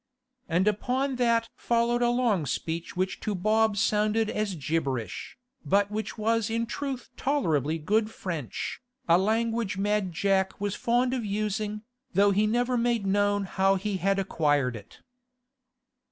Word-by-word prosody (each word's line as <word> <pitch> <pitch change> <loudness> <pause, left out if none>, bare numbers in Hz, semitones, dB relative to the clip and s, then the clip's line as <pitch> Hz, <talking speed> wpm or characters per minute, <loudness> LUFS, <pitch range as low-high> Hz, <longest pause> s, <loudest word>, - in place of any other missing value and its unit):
And 180 +4 +2
upon 255 +6 0
that 235 -2 +2
followed 235 +1 +1
a 240 - +3
long 235 - +1
speech 165 +4 -3
which 185 +1 -1
to 210 - -2
Bob 215 +2 +2
sounded 215 +1 +2
as 210 -3 -2
gibberish, 135 - -3 0.3
but 200 +1 +2
which 215 +2 -4
was 225 0 +1
in 230 +1 0
truth 265 +1 -5
tolerably 165 - 0
good 215 +7 +1
French, 170 - -5 0.3
a 170 +1 +5
language 225 0 0
Mad 205 -1 0
Jack 190 +2 +1
was 205 -1 -1
fond 245 +3 +1
of 250 -3 -1
using, 210 +1 -2 0.3
though 200 +1 +5
he 210 +2 +2
never 245 +3 +1
made 235 -3 +1
known 205 +1 +2
how 195 0 +2
he 195 +1 -2
had 195 +2 +1
acquired 145 -9 +1
it. 105 -2 -12
210 Hz, 145 wpm, -27 LUFS, 190-230 Hz, 0.3 s, a